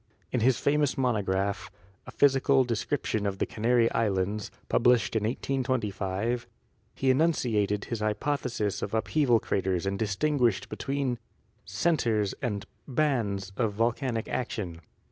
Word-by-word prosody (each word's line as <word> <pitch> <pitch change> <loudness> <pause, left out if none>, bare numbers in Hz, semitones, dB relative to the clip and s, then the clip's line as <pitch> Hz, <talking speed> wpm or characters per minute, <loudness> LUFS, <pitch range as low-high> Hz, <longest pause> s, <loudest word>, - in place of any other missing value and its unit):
In 125 - +1
his 125 +2 +3
famous 145 0 +1
monograph, 100 -6 0 0.4
"A - - -7
Physical 135 -1 +4
Description 115 -2 -1
of 100 -1 -2
the - - 0
Canary 115 +1 +2
Islands," 100 -1 0 0.2
published 120 -1 +3
in 110 -1 +1
1825, 120 -3 -1 0.5
he 135 -1 +2
enunciated 115 -9 +1
his 115 - -3
hypothesis 105 -1 -1
of 105 - -3
upheaval 115 +3 +3
craters 95 -3 -1
and 100 0 -1
distinguished 115 +2 +1
between 135 -3 -2 0.5
''centers" 115 - +1
and 105 -7 -2 0.2
"bands" 115 -10 0
of 110 -2 0
volcanic 115 +1 0
action. 95 -9 -3
115 Hz, 120 wpm, -28 LUFS, 100-130 Hz, 0.5 s, Physical